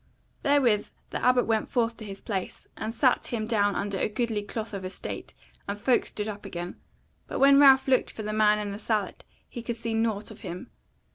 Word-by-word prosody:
Therewith 255 -7 +3 0.2
the - - -4
Abbot 250 -1 +4
went 220 -1 0
forth 230 -2 +1
to 220 - -9
his 195 -1 -8
place, 190 -4 -4
and 220 - -4
sat 250 +2 +2
him 225 -3 -2
down 205 -3 +2
under 200 -1 -2
a - - +1
goodly 220 -1 -1
cloth 215 +2 -6
of 195 -1 -4
estate, 185 +1 -6 0.3
and 200 +1 -3
folk 245 +4 +2
stood 210 0 -4
up 205 -1 -6
again; 175 -2 -6 0.5
but - - -4
when 275 +1 +7
Ralph 270 -2 +7
looked 260 -1 +3
for 220 - -7
the 215 0 -3
man 210 -1 +4
in 210 -1 -3
the 200 - -6
sallet 210 -3 -2 0.2
he 240 - -7
could 235 0 -3
see 230 0 -3
nought 225 -2 -1
of - - -12
him. 180 -4 -7
215 Hz, 210 wpm, -27 LUFS, 205-235 Hz, 0.5 s, when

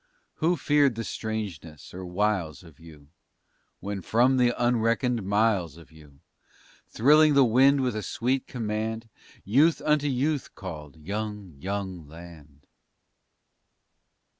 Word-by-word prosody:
Who 170 +3 +1
feared 145 -3 +2
the 115 - -4
strangeness 100 -10 -6
or 95 +1 -7
wiles 90 -5 -1
of 80 -5 -17
you 75 -3 -15 0.7
When 100 -1 -4
from 125 +7 +2
the 125 -1 +4
unreckoned 120 0 +1
miles 100 -5 0
of 85 - -16
you, 75 -3 -18 0.7
Thrilling 150 +5 +4
the 140 -1 +6
wind 135 +4 +4
with 125 -3 -1
a 110 - -2
sweet 130 +5 -2
command, 110 -1 -4 0.4
Youth 145 - +3
unto 150 -1 +2
youth 140 +1 -1
called, 80 -5 -9
young, 105 +2 -5
young 95 -2 -5
land? 75 -3 -14
105 Hz, 120 wpm, -26 LUFS, 85-125 Hz, 0.7 s, the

